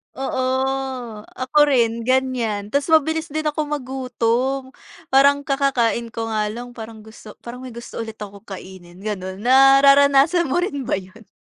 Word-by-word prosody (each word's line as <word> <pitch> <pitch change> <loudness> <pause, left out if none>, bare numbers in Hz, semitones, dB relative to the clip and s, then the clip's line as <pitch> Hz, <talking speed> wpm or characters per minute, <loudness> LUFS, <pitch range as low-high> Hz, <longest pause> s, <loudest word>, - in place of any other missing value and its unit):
Oo, 265 -1 -3 1.0
ako 255 +3 -3
rin 235 -4 +1
ganyan. 245 -6 0
Ta's 280 0 0
mabilis 320 0 +2
din 310 0 -4
akong 300 0 -2
magutom, 260 -1 -2 0.4
parang 280 +1 +4
kakakain 270 -5 0
ko 225 0 -4
nga 215 -1 0
lang 240 +3 -7
parang 225 -2 -10
gusto 220 -1 -13
parang 240 +1 -8
may 255 -2 -9
gusto 235 - -8
ulit 225 -1 -6
akong 205 -1 -10
kainin, 185 -1 -11
ganun. 190 -2 -5
Nararanasan 275 +5 +5
mo 265 - 0
rin 285 -8 -4
ba - - +1
yun? 195 +3 -11
250 Hz, 145 wpm, -21 LUFS, 220-275 Hz, 1.0 s, Nararanasan